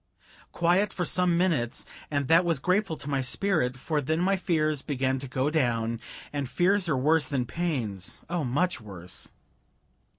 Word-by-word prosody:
Quiet 180 Hz, +4 st, +2 dB
for 180 Hz, -, -2 dB
some 180 Hz, -1 st, +3 dB
minutes, 160 Hz, -10 st, 0 dB, 0.2 s
and 145 Hz, -2 st, -1 dB
that 165 Hz, +4 st, +6 dB
was 170 Hz, -3 st, +1 dB
grateful 185 Hz, +3 st, +1 dB
to 140 Hz, -, -9 dB
my 140 Hz, -2 st, 0 dB
spirit, 130 Hz, -2 st, +1 dB
for 150 Hz, +3 st, -1 dB
then 155 Hz, +4 st, 0 dB
my 190 Hz, +3 st, +3 dB
fears 155 Hz, -6 st, 0 dB
began 130 Hz, -2 st, -1 dB
to 135 Hz, -, -6 dB
go 130 Hz, +3 st, 0 dB
down; 115 Hz, -6 st, 0 dB, 0.3 s
and 140 Hz, -3 st, -2 dB
fears 185 Hz, +3 st, +2 dB
are 145 Hz, -, +2 dB
worse 150 Hz, +2 st, +3 dB
than 130 Hz, -3 st, -1 dB
pains 120 Hz, -, -2 dB
oh, 170 Hz, -1 st, -1 dB
much 145 Hz, +4 st, 0 dB
worse. 95 Hz, -4 st, -7 dB
150 Hz, 165 wpm, -27 LUFS, 130-175 Hz, 0.3 s, that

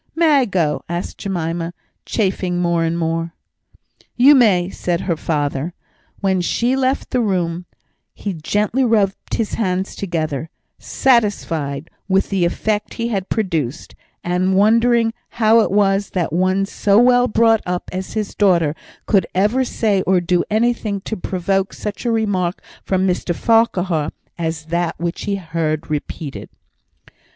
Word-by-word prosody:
"May 325 Hz, -1 st, +4 dB
I 260 Hz, -, +2 dB
go?" 165 Hz, -, 0 dB
asked 175 Hz, +1 st, -4 dB
Jemima, 170 Hz, -3 st, -3 dB, 0.3 s
chafing 185 Hz, -4 st, 0 dB
more 170 Hz, -1 st, +1 dB
and 165 Hz, +1 st, 0 dB
more. 165 Hz, 0 st, -2 dB, 0.8 s
"You 265 Hz, +4 st, +7 dB
may," 195 Hz, -9 st, +4 dB
said 175 Hz, -2 st, -2 dB
her 175 Hz, -3 st, -1 dB
father. 150 Hz, +1 st, -2 dB, 0.5 s
When 190 Hz, -2 st, +1 dB
she 240 Hz, +8 st, +1 dB
left 265 Hz, 0 st, 0 dB
the 250 Hz, -, +1 dB
room 180 Hz, -4 st, -1 dB, 0.5 s
he 200 Hz, -, -4 dB
gently 210 Hz, +10 st, 0 dB
rubbed 210 Hz, -5 st, +1 dB
his 220 Hz, -, -2 dB
hands 190 Hz, -3 st, -1 dB
together, 160 Hz, -5 st, -3 dB, 0.3 s
satisfied 165 Hz, -, 0 dB, 0.2 s
with 195 Hz, +1 st, +1 dB
the 190 Hz, -3 st, +2 dB
effect 210 Hz, +4 st, -1 dB
he 230 Hz, 0 st, -2 dB
had 195 Hz, -4 st, -2 dB
produced, 165 Hz, -, -2 dB, 0.3 s
and 180 Hz, +2 st, +1 dB
wondering 230 Hz, +3 st, +3 dB, 0.2 s
how 225 Hz, 0 st, +5 dB
it 225 Hz, -, +2 dB
was, 195 Hz, 0 st, +2 dB
that 170 Hz, -4 st, -1 dB
one 185 Hz, +3 st, +2 dB
so 200 Hz, 0 st, +1 dB
well 245 Hz, +1 st, +5 dB
brought 225 Hz, -1 st, +3 dB
up 180 Hz, 0 st, -2 dB
as 185 Hz, 0 st, -5 dB
his 215 Hz, -2 st, -3 dB
daughter 170 Hz, -7 st, +3 dB, 0.3 s
could 195 Hz, -5 st, +2 dB
ever 210 Hz, +8 st, +2 dB
say 210 Hz, -6 st, 0 dB
or 185 Hz, -1 st, +4 dB
do 175 Hz, 0 st, +1 dB
anything 220 Hz, -2 st, 0 dB
to 220 Hz, -, -4 dB
provoke 190 Hz, +1 st, -1 dB
such 210 Hz, +3 st, -6 dB
a 235 Hz, -, +2 dB
remark 200 Hz, -5 st, -1 dB, 0.2 s
from 190 Hz, 0 st, 0 dB
Mr 180 Hz, -1 st, -1 dB
Farquhar 190 Hz, -9 st, +2 dB, 0.3 s
as 160 Hz, -2 st, -3 dB
that 170 Hz, +1 st, -2 dB
which 170 Hz, +1 st, -3 dB
he 200 Hz, -, 0 dB
had 180 Hz, -5 st, -9 dB
heard 155 Hz, -1 st, -2 dB
repeated. 150 Hz, -1 st, -5 dB
190 Hz, 145 wpm, -19 LUFS, 170-215 Hz, 0.8 s, You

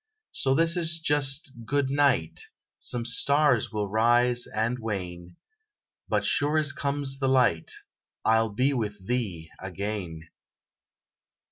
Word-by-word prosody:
So 135 Hz, 0 st, +1 dB
this 165 Hz, +3 st, +2 dB
is 165 Hz, -1 st, 0 dB
just 145 Hz, -2 st, 0 dB
"good 140 Hz, +2 st, 0 dB
night"; 140 Hz, -, +1 dB, 0.3 s
Some 120 Hz, -2 st, -1 dB
stars 140 Hz, +1 st, +2 dB
will 105 Hz, -1 st, -2 dB
rise 120 Hz, +3 st, +3 dB
and 115 Hz, +3 st, -1 dB
wane, 90 Hz, -5 st, -5 dB, 0.7 s
But -, -, +1 dB
sure 150 Hz, +2 st, +2 dB
as 150 Hz, -2 st, +2 dB
comes 140 Hz, -1 st, -2 dB
the 135 Hz, -, 0 dB
light, 125 Hz, -11 st, +2 dB, 0.5 s
I'll 110 Hz, 0 st, +3 dB
be 130 Hz, +7 st, +1 dB
with 105 Hz, -6 st, -3 dB
thee 95 Hz, -10 st, -3 dB
again! 95 Hz, -3 st, -5 dB
120 Hz, 120 wpm, -27 LUFS, 105-140 Hz, 0.7 s, rise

